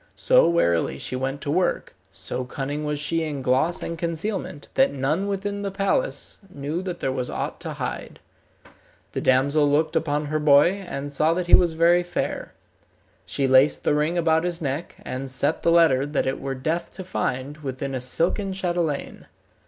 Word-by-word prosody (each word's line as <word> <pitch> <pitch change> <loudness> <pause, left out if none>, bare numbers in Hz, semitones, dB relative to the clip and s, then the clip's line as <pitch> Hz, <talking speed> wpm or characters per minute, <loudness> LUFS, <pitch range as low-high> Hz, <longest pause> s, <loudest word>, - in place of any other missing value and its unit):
So - - +4
warily 85 - +1
she 130 - -4
went 135 +2 -3
to 145 - -2
work, 180 +3 0 0.2
so 130 - -4
cunning 140 +4 -4
was 150 0 -1
she 165 +3 0
in 150 -4 -3
gloss 130 +7 +1
and 170 -1 -5
concealment, 170 -2 -3
that 270 0 +4
none 150 +8 -1
within 200 0 -3
the 200 - -2
palace 200 - -1
knew 150 +2 -4
that 180 -2 -5
there 135 - 0
was 125 -1 -3
aught - - -4
to - - -5
hide. - - -5 0.9
The - - -3
damsel 140 +3 +3
looked 155 +3 +1
upon 150 -2 0
her 155 +1 -1
boy, 150 +2 +6 0.2
and 145 -1 -5
saw 155 +3 +2
that 180 0 -1
he 175 - -1
was 175 -2 +6
very 170 +2 +4
fair. 175 0 -4 0.7
She 135 - 0
laced 130 +2 +4
the - - +2
ring 150 +4 +1
about 160 -1 +2
his 175 -1 -2
neck, 145 +1 -3
and 130 +1 -5
set 140 +4 0
the 170 - +3
letter 165 -6 +5
that 145 0 0
it 130 - -1
were 135 -1 -3
death 160 +6 -2
to 190 - -7
find, 140 -5 -3
within 135 -1 -4
a 130 - -2
silken 175 - 0
chatelaine. 175 -6 -2
155 Hz, 185 wpm, -24 LUFS, 135-175 Hz, 0.9 s, boy